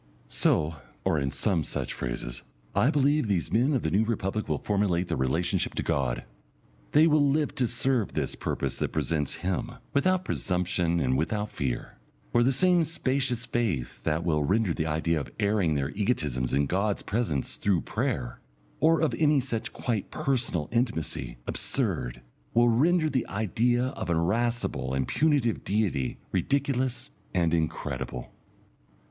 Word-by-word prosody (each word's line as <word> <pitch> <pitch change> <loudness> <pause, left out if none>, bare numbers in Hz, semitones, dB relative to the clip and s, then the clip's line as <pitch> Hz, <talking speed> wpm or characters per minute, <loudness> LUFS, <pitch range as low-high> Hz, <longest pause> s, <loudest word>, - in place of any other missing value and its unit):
So, 80 +1 +2 0.3
or 80 - +2
in 70 -1 0
some 85 +2 +1
such - - -3
phrases, - - -4 0.3
I 130 - +3
believe, 145 -2 +2
these 95 -5 0
men 125 +6 +3
of 130 - 0
the 80 - 0
New 100 +5 +3
Republic 110 -2 -2
will - - +1
formulate 100 -4 0
their - - 0
relationship 75 +7 0
to - - -1
God. - - 0 0.7
They 150 +2 +7
will 155 -2 +4
live 145 +1 +2
to 125 - +1
serve 120 -1 0
this - - -1
purpose 70 - -3
that - - -1
presents 75 -4 0
Him, 115 +6 -1 0.2
without 185 +5 +2
presumption 90 - 0
and 65 -4 +1
without 105 +6 -1
fear. 65 -3 -3 0.3
For 120 - +4
the 125 +3 +4
same 175 +5 +4
spacious 130 -5 -1
faith 85 - -2
that 80 +1 0
will 75 -3 +2
render 95 +3 +2
the 80 - -2
idea 80 +1 +1
of 70 - -6
airing 100 -6 +2
their 70 +1 -1
egotisms 75 - -1
in 70 +1 +2
God's 100 +6 0
presence 105 - -1
through 95 -5 +1
prayer, - - -2 0.4
or 165 +1 +4
of 160 - +2
any 150 -2 +4
such 120 -3 -3
quite 115 -5 -2
personal 115 - -1
intimacy, 80 - -1
absurd, 60 0 -1 0.3
will 120 +1 +5
render 155 +8 +3
the 130 -5 -1
idea 120 +5 +1
of 135 - -5
an 85 - +2
irascible 110 - 0
and 65 -1 0
punitive 145 -7 +2
Deity 95 - 0
ridiculous 130 -2 0 0.2
and 85 -2 +2
incredible.... 80 -6 -2
105 Hz, 155 wpm, -28 LUFS, 80-125 Hz, 0.7 s, They